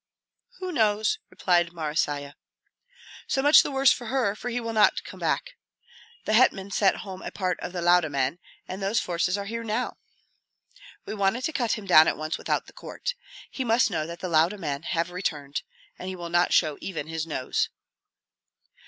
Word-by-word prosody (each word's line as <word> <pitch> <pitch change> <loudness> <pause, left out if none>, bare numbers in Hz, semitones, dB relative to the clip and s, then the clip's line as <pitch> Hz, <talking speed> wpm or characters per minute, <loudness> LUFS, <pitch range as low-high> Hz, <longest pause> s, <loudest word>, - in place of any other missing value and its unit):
"Who 370 -3 -4
knows?" 215 -6 +2
replied 175 -2 +1
Marysia. 150 -3 -2 0.9
"So 270 - 0
much 295 +1 +8
the - - -3
worse 270 -1 +4
for 240 - -2
her, 250 -5 +1
for 245 - -5
he 245 0 -2
will 230 -1 -4
not 215 -1 +4
come - - -10
back. - - -1 0.7
The 215 - 0
hetman 200 -4 +3
sent 195 -1 +3
home 190 -1 -8
a - - -5
part 185 -2 -2
of - - -5
the 175 -1 -4
Lauda 175 -2 +4
men, 140 +3 -1 0.3
and 185 +2 -6
those 200 +4 +1
forces 180 +2 0
are 200 - -4
here 230 +3 -4
now. 225 +3 -2 1.1
We - - -5
wanted 205 +4 0
to 315 - -1
cut 240 -6 0
him 215 - -5
down 160 -4 +7
at - - +1
once 155 +1 -3
without - - -1
the - - -16
court. 485 - -5 0.4
He 265 - -3
must 230 -1 +3
know 155 -3 -1
that 170 0 -8
the 185 - -2
Lauda 170 +4 +3
men 145 -6 -3
have 165 +1 -2
returned, 150 -6 -3 0.4
and 185 - -5
he 190 - -5
will 170 -1 -6
not 175 +1 +2
show 155 -4 +2
even 175 -6 -4
his 160 0 -4
nose." 130 -5 -1
185 Hz, 190 wpm, -26 LUFS, 165-225 Hz, 1.1 s, much